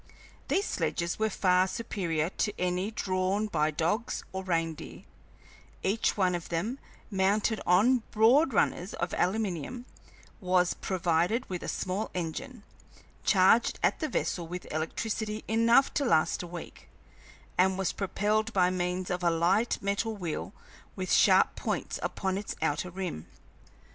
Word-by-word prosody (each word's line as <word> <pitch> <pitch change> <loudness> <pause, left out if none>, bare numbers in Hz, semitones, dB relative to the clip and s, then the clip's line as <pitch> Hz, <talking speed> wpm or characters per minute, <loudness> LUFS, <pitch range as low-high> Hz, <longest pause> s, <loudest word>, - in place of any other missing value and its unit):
These 400 - +1
sledges 170 - -2
were 220 0 +2
far 185 -2 +3
superior 180 -6 -2
to 210 +1 -2
any 180 +2 0
drawn 190 -1 -1
by 155 -7 +1
dogs 170 +10 -1
or 190 0 -4
reindeer; 165 -3 -3 0.8
each 210 +4 +1
one 185 -2 +2
of 175 -2 -4
them, 210 +11 -2 0.3
mounted 205 +3 +1
on 225 +8 +4
broad 250 +8 +4
runners 185 -3 0
of 175 - -3
aluminium, 200 - -1 0.5
was 180 -2 +2
provided 180 +5 0
with 180 - -3
a - - -6
small 190 +3 -2
engine, 200 - -5 0.6
charged 195 +4 +4
at - - +2
the 310 - -1
vessel 170 -2 -2
with 180 +2 -6
electricity 215 +7 -3
enough 230 +4 +4
to 290 - +1
last 160 - +2
a 175 - -7
week, 170 -1 -9 0.7
and 190 +1 +3
was 195 -2 -1
propelled 210 +2 0
by 180 -2 +3
means 180 0 -2
of 180 0 -2
a 170 - +4
light 180 +8 +2
metal 205 +2 -1
wheel 165 - -4 0.4
with - - -4
sharp - - +5
points - - -3
upon 190 0 -2
its 210 - -5
outer 160 +3 -1
rim. 180 - -5
190 Hz, 140 wpm, -29 LUFS, 175-215 Hz, 0.8 s, sharp